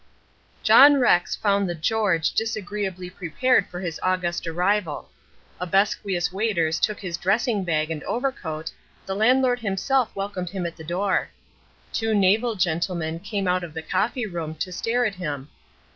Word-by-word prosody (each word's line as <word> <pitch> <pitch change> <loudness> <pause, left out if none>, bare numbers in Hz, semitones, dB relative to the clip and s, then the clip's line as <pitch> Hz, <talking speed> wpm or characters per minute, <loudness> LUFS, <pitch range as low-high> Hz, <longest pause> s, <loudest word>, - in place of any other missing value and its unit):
John 285 +1 +8
Rex 180 -8 +3
found 200 -2 +1
the 175 - -2
"George" 185 -1 +1
disagreeably 205 -4 -3
prepared 195 +8 +1
for 175 - -7
his 175 -4 -4
august 180 -2 -1
arrival. 180 -1 -1 0.5
Obsequious 190 0 0
waiters 180 -6 0
took 210 - 0
his 175 -3 -4
dressing 205 +3 +1
bag 155 -2 0
and 155 -2 -4
overcoat, 175 - -3 0.3
the 190 - -3
landlord 245 +3 +3
himself 230 +4 0
welcomed 195 -3 -4
him 185 -1 -4
at 170 - -4
the 160 - -11
door. 185 +4 0 0.6
Two 225 -1 0
naval 210 +4 +3
gentlemen 170 -2 -1
came 200 +1 -3
out 180 0 +1
of 160 -3 -8
the 160 - -5
coffee 240 - -1
room 165 -5 -5
to 185 +4 -4
stare 235 +6 0
at 215 - 0
him. 150 -6 -5
185 Hz, 150 wpm, -24 LUFS, 170-215 Hz, 0.6 s, John